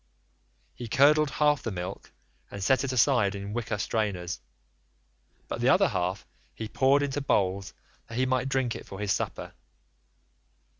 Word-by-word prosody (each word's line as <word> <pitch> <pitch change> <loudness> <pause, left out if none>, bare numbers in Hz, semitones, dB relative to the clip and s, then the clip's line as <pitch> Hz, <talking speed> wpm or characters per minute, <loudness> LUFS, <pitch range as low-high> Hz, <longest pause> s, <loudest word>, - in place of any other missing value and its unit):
He 120 - -7
curdled 150 +5 +4
half 150 0 +2
the - - -3
milk 95 -1 -6 0.4
and 100 -1 -6
set 130 +7 +3
it 135 - -2
aside 120 -5 +3
in 100 +1 -6
wicker 115 -3 -2
strainers, 100 - -2 1.1
but - - -4
the - - +3
other - - +5
half 90 +2 -2 0.3
he 110 - -5
poured 135 +5 +3
into 145 0 -2
bowls 95 -6 0 0.3
that 115 - -7
he 130 - +2
might 130 0 0
drink 130 -3 0
it - - -9
for 95 - -8
his 105 -1 -1
supper. - - -4
115 Hz, 155 wpm, -28 LUFS, 100-135 Hz, 1.1 s, other